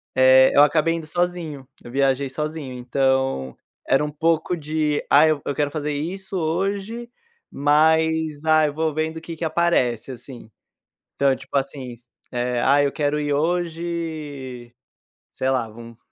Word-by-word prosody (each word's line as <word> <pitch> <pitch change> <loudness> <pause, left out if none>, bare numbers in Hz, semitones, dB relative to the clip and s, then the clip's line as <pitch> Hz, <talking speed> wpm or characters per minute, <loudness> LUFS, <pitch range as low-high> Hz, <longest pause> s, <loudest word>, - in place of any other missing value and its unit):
Eh, 130 0 +6
eu 145 - +8
acabei 165 +2 +2
indo 165 -2 -5
sozinho, 165 -5 -3 0.2
eu 120 - -10
viajei 135 0 +1
sozinho, 150 -1 -4
então 130 - 0 0.3
era 135 +2 +3
um - - -3
pouco 165 +3 0
de 150 -1 -1
ah, 150 +3 +6
eu 155 -2 +1
eu 140 - -1
quero 145 -1 0
fazer 150 -1 -3
isso 190 +6 -4
hoje, 195 +8 -2 0.4
mas 160 +1 +2
ah, 155 -1 +5
eu 145 - -4
vou 160 0 -1
vendo 160 +1 -2
o - - -7
que 165 0 -7
que 165 - -4
aparece, 155 -8 +1
assim. 125 -2 -10 0.7
Então, 135 -1 +3
tipo - - -10
assim, 135 -2 -4
se 120 - -23 0.3
eh, 125 0 -1
ah, 140 +2 +4
eu 140 - +1
quero 150 -1 -1
ir 145 -1 -1
hoje, 160 -6 -3 0.6
sei 130 - -2
lá, 130 -4 0
vamos 115 +1 -12
150 Hz, 160 wpm, -22 LUFS, 130-160 Hz, 0.7 s, eu